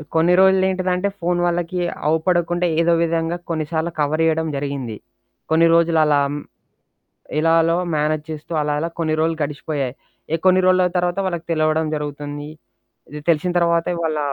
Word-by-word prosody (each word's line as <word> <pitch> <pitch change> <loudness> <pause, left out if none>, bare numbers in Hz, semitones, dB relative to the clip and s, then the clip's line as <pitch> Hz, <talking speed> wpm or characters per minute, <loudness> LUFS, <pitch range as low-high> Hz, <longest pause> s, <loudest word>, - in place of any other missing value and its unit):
కొన్ని 170 +2 +4
రోజులు 190 0 +5
ఏంటిదంటే 185 +1 0
ఫోను 175 0 0
వాళ్ళకి 175 +1 -2 0.3
అవపడకుండా 175 +2 +1
ఏదో 170 0 +3
విధంగా 165 +1 -1
కొన్నిసార్లు 160 +1 -2
కవర్ 150 +2 +1
జేయడం 160 0 +1
జరిగింది. 140 -5 -4 0.5
కొన్ని 165 +1 +4
రోజులలా. 160 -3 +3
హ్మ్, 145 - -4 1.0
ఇలాలో 165 +1 +3 0.2
మేనేజ్ 150 0 0
చేస్తూ 155 +2 -9
అలాలా 150 +2 -1
కొన్ని 155 -1 0
రోజులు 160 0 +1
గడిచిపోయాయి. 145 -3 -3 0.4
ఏహ్! 165 - -1
కొన్ని 185 0 +5
రోజుల 185 0 +4
తర్వాత 175 +1 0
వాళ్ళకి 170 -3 -4
తెలవడం 155 0 +1
జరుగుతుంది. 145 0 -5 0.6
ఇది 150 - -6
తెలిసిన 170 +2 +2
తర్వాతే 170 0 +1
వాళ్ళ 155 -2 -1
165 Hz, 140 wpm, -20 LUFS, 150-175 Hz, 1.0 s, రోజులు